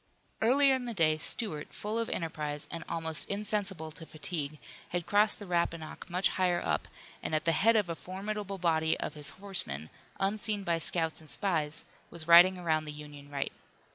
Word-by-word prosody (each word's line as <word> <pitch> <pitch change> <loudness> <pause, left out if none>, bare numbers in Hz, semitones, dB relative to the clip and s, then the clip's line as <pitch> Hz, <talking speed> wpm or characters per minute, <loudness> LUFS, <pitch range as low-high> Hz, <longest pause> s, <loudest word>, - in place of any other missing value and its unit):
Earlier 270 +4 +5
in 260 -1 -1
the 235 -2 -5
day 155 -4 +4
Stuart, 155 -2 -3
full 215 +2 -3
of 230 - -1
enterprise, 150 -3 -3
and 165 - -5
almost 160 -1 +1
insensible 200 -5 +1
to 160 +1 -10
fatigue, 155 -2 -2 0.3
had 175 -1 -2
crossed 205 +1 +4
the 205 - -9
Rappahannock 170 -1 -2
much 180 +2 +2
higher 180 -2 +1
up - - -1 0.3
and 155 - -2
at 155 - -1
the 165 - +4
head 225 +8 +4
of 210 -4 +3
a 170 - -2
formidable 195 +3 -5
body 160 -3 +1
of - - -3
his 150 -1 -6
horsemen, 180 - -4 0.3
unseen 205 +1 +1
by 170 -2 0
scouts 165 -1 +2
and 155 - -15
spies, 155 -6 -1 0.2
was 165 -2 -8
riding 175 +2 +8
around 160 -3 0
the 150 - -5
Union 145 -1 -11
right. 140 -1 -3
170 Hz, 180 wpm, -31 LUFS, 155-200 Hz, 0.3 s, riding